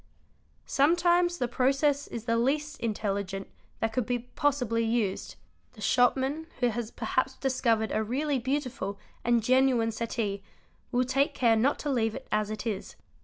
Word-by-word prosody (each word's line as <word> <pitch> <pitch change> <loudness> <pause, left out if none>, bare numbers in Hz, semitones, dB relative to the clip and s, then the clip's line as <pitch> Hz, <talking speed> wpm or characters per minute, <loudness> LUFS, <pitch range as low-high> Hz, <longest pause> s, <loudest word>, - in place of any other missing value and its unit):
Sometimes 345 +4 +3
the 245 - 0
process 275 +3 +1
is 230 - -6
the 230 -1 +1
least 285 +5 0
intelligent 200 -3 -2 0.3
that 225 0 0
could 245 -1 -1
be 245 -1 +1
possibly 245 -2 0
used; 225 -4 -1 0.4
the 220 - -17
shopman 265 +7 +2
who 245 -1 +3
has 230 -1 -3
perhaps 260 +3 -1
discovered 235 -5 +1
a 215 - +1
really 270 +5 0
beautiful 255 -6 -2 0.3
and 240 -1 +2
genuine 255 -2 +3
settee 220 -3 -2 0.5
will 250 +1 +2
take 275 +3 +1
care 235 -3 +4
not 250 +6 +2
to 295 - -2
leave 225 -4 +1
it 265 - -8
as 210 -1 +1
it 215 0 -5
is. 210 -4 -4
245 Hz, 155 wpm, -28 LUFS, 225-270 Hz, 0.5 s, care